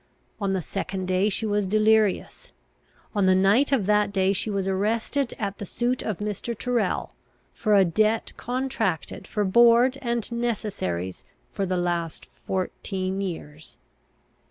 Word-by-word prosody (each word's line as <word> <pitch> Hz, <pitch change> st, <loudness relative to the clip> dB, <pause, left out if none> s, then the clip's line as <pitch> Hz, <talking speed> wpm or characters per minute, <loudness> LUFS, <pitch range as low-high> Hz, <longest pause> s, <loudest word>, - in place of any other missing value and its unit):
On 200 Hz, -2 st, 0 dB
the 185 Hz, -2 st, -1 dB
second 190 Hz, 0 st, -4 dB
day 185 Hz, +3 st, +2 dB
she 215 Hz, +2 st, -1 dB
was 205 Hz, -2 st, 0 dB
delirious. 215 Hz, 0 st, +2 dB, 0.6 s
On 200 Hz, -3 st, +2 dB
the 185 Hz, -, +5 dB
night 200 Hz, +10 st, +4 dB
of 250 Hz, -8 st, +2 dB
that 210 Hz, 0 st, +3 dB
day 195 Hz, -1 st, +2 dB
she 200 Hz, -, -1 dB
was 195 Hz, -2 st, -1 dB
arrested 225 Hz, +7 st, 0 dB
at 200 Hz, -2 st, -4 dB
the -, -, -4 dB
suit 245 Hz, +5 st, -1 dB
of 215 Hz, -5 st, -3 dB
Mr. 210 Hz, +2 st, -4 dB
Tyrrel, 240 Hz, -6 st, -1 dB, 0.4 s
for 215 Hz, -3 st, +2 dB
a 195 Hz, -1 st, +6 dB
debt 215 Hz, +5 st, +1 dB
contracted 245 Hz, -, -2 dB
for 210 Hz, -1 st, -1 dB
board 235 Hz, +6 st, +5 dB
and 235 Hz, -2 st, -2 dB
necessaries 205 Hz, -, -3 dB, 0.3 s
for 195 Hz, -, -2 dB
the 185 Hz, 0 st, 0 dB
last 170 Hz, -5 st, -2 dB, 0.2 s
fourteen 190 Hz, 0 st, -2 dB
years. 160 Hz, -5 st, -7 dB
205 Hz, 145 wpm, -25 LUFS, 185-230 Hz, 0.6 s, a